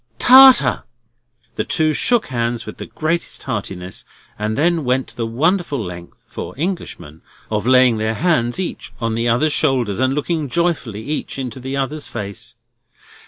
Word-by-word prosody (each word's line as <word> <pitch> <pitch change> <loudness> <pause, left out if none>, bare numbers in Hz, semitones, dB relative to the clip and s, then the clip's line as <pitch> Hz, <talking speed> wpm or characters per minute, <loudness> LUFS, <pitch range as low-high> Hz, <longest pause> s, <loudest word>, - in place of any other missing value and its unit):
Tartar!" 255 - +7 0.7
The - - 0
two 155 -2 +1
shook 240 +7 +2
hands 120 -2 -2
with 110 - -8
the - - -7
greatest 165 +2 -2
heartiness, 95 -6 -5 0.4
and 110 +1 -2
then 165 +1 +2
went 125 -2 -1
the 115 -1 -3
wonderful 155 +5 0
length—for 90 -1 -8
Englishmen—of 110 - -5
laying 125 -2 +5
their 110 +1 -1
hands 125 -7 +1
each 185 - -5
on 115 -1 -1
the 115 +1 0
other's 145 +6 +2
shoulders, 120 -6 0
and 130 +1 +1
looking 150 -1 -2
joyfully 150 - -1
each 150 +2 -4
into 130 -1 -5
the 130 +2 -4
other's 145 +2 -3
face. 105 +3 -7
130 Hz, 145 wpm, -19 LUFS, 110-155 Hz, 0.7 s, Tartar